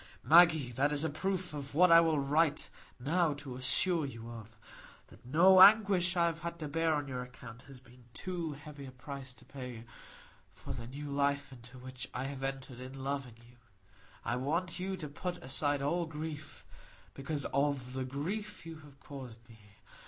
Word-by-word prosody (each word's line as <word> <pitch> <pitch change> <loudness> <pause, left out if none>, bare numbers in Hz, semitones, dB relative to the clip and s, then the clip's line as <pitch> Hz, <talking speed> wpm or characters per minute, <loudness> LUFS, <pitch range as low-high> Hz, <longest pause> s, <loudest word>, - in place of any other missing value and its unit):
Maggie, 160 -6 +6
that 140 +5 +1
is 150 0 +1
a 160 - 0
proof 185 +1 -2
of 140 -1 -7
what 180 +2 +6
I 165 - +10
write 155 -1 +2 0.3
now 155 +3 +1
to 140 -3 -8
assure 160 +7 +1
you 115 -4 -7
of,—that 110 -1 -15
no 185 +7 +7
anguish 195 -4 +6
I 170 - +4
have 165 -1 -1
had 170 +1 -5
to 155 -3 -5
bear 165 +1 +1
on 145 -1 -2
your 130 -2 -4
account 125 -1 -11
has 135 -2 -12
been 125 -1 -19
too 170 +2 -4
heavy 145 -1 -10
a - - -9
price 130 +1 -8
to - - -18
pay 125 -4 -8 0.7
for - - -7
the 115 - -7
new 145 +3 -7
life 140 0 0
into 125 +1 -13
which 130 0 -8
I 125 - -2
have 135 0 -5
entered 135 -2 -4
in 130 +1 -8
loving 135 -4 -3
you. 120 0 -20 0.7
I 120 - 0
want 165 +7 -1
you 190 +1 -3
to 155 -4 -6
put 175 +5 -5
aside 140 0 0
all 170 +4 0
grief 155 -1 -7 0.5
because 140 0 -2
of 140 -2 0
the 130 0 -2
grief 175 +11 -4
you 165 -1 -8
have 145 -2 -16
caused 125 -5 -10
me. 115 -1 -16
140 Hz, 180 wpm, -33 LUFS, 130-165 Hz, 0.7 s, I